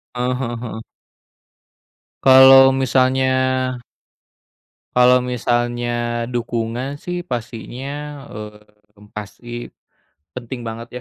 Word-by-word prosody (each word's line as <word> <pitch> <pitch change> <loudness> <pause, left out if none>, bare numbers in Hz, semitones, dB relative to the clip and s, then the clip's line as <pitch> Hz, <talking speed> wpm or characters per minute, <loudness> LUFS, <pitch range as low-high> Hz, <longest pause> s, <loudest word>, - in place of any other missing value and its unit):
Heeh 125 +1 -1
heeh 120 -2 -3
heeh. 110 -1 -7 1.4
Kalau 135 0 +8
misalnya 130 0 +2 1.7
kalau 125 +1 +6
misalnya 120 -1 -1
dukungan 120 +1 -3
sih 175 0 -4
pastinya 120 -1 -6 0.4
eee, 105 -1 -13
pasti, 105 +3 -9 0.9
penting 120 +1 -6
banget 115 +1 -7
120 Hz, 75 wpm, -20 LUFS, 115-130 Hz, 1.7 s, Kalau